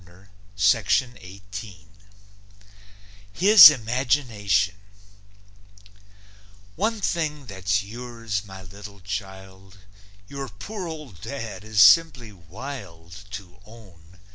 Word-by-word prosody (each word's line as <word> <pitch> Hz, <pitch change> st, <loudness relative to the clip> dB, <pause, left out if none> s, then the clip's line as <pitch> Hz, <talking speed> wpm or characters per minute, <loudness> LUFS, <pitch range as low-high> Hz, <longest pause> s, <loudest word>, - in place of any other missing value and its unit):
HIS 200 Hz, -2 st, +10 dB
IMAGINATION 115 Hz, -6 st, 0 dB, 2.0 s
One 220 Hz, +4 st, -1 dB
thing 155 Hz, -7 st, -3 dB
that's 95 Hz, 0 st, -2 dB
yours, 115 Hz, -1 st, -6 dB
my 95 Hz, -2 st, -12 dB
little 100 Hz, +2 st, -12 dB
child 95 Hz, -1 st, -9 dB, 0.5 s
Your 140 Hz, +1 st, -7 dB
poor 180 Hz, -, -8 dB
old 150 Hz, -, -10 dB
dad 115 Hz, -8 st, -7 dB
is 110 Hz, -2 st, +1 dB
simply 120 Hz, +1 st, +5 dB
wild 95 Hz, -, -11 dB
To 100 Hz, -3 st, -10 dB
own. 95 Hz, -6 st, -18 dB
105 Hz, 75 wpm, -23 LUFS, 95-135 Hz, 2.0 s, HIS